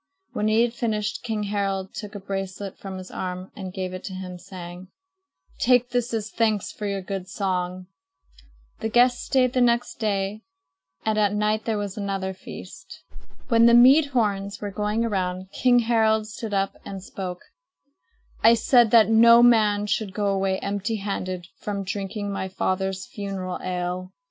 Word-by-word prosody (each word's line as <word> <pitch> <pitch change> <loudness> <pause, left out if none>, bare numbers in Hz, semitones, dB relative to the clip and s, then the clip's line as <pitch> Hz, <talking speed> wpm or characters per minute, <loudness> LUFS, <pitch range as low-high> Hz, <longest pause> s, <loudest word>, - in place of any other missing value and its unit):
When 210 - 0
he 220 +2 +4
had 240 -1 -1
finished, 215 -4 -2
King 220 -3 -2
Harald 195 -2 -2
took 210 -1 -7
a - - -4
bracelet 195 0 -5
from 190 -1 -7
his 185 0 -9
arm 185 0 -5
and 190 -3 -6
gave 185 -1 -4
it 185 - -7
to 190 - -6
him, 180 -1 -7
saying: 180 0 -9 0.7
"Take 245 0 +3
this 245 0 0
as 220 -2 -3
thanks 215 -3 0
for 210 - -5
your 195 -1 -3
good 190 -1 -5
song." 185 -1 -2 0.9
The 220 - -2
guests 245 +2 +3
stayed 255 -2 +2
the 255 - +2
next 240 0 +1
day 205 -1 -1 0.6
and 215 -1 +1
at 205 -1 +2
night 210 +1 0
there 225 -2 0
was 205 -1 -4
another 195 -1 -2
feast. 180 -5 -11 0.5
When 230 -1 +6
the 235 - +7
mead 270 +5 +7
horns 205 -6 -1
were 205 -1 -4
going 210 +3 -1
around, 185 -3 -2
King 250 +2 +3
Harald 220 -2 +3
stood 220 0 -7
up 195 -1 -1
and 195 -2 -7
spoke: 185 -2 -6 1.0
"I 230 +1 +8
said 240 0 +4
that 220 -2 +6
no 230 +1 +7
man 210 -4 +4
should 210 -1 -2
go 205 -1 0
away 190 -1 0
empty 205 +3 -2
handed 185 -3 -4
from 200 -1 -3
drinking 200 +1 -4
my 190 -1 -3
father's 190 +1 -2
funeral 195 -6 -5
ale." 180 0 -3
205 Hz, 170 wpm, -24 LUFS, 190-225 Hz, 1.0 s, I